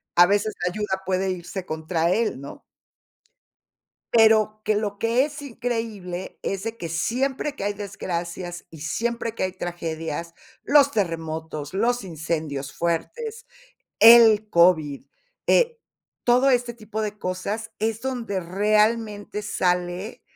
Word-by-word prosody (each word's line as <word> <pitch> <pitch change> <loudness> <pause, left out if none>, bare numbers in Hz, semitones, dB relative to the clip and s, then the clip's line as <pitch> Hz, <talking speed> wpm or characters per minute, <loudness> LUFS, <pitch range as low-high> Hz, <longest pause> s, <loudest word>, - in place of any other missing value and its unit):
a 175 - +8
veces 205 +3 +1
la 180 - +1
ayuda 190 -1 -2
puede 190 0 0
irse 180 +1 -6
contra 160 +1 -1
él, 225 - 0
¿no? 140 +1 -9 1.5
Pero 220 -1 +5
que 215 - +2
lo 205 -1 -2
que 230 +3 +3
es 295 0 -5
increíble 225 -8 -4
es 195 0 -3
de 225 0 -4
que 170 -7 -6
siempre 265 - -1
que 200 - -5
hay 205 0 0
desgracias 175 -3 -5
y 160 -2 -12
siempre 230 +8 -2
que 230 - -3
hay 185 -1 -1
tragedias, 170 -2 -4 0.3
los 285 -1 +5
terremotos, 160 - -3
los 235 +3 +1
incendios 155 -5 -4
fuertes, 445 - -3 0.6
el 225 -2 +8
COVID, 160 -6 +3 0.4
eh, 475 -1 +3 0.5
todo 250 +3 +4
este 245 -2 +2
tipo 220 -1 -5
de 210 -1 -4
cosas 205 +5 -3
es 220 0 -1
donde 235 -6 -3
realmente 210 +3 +1
sale 180 +2 -1
205 Hz, 130 wpm, -24 LUFS, 175-230 Hz, 1.5 s, a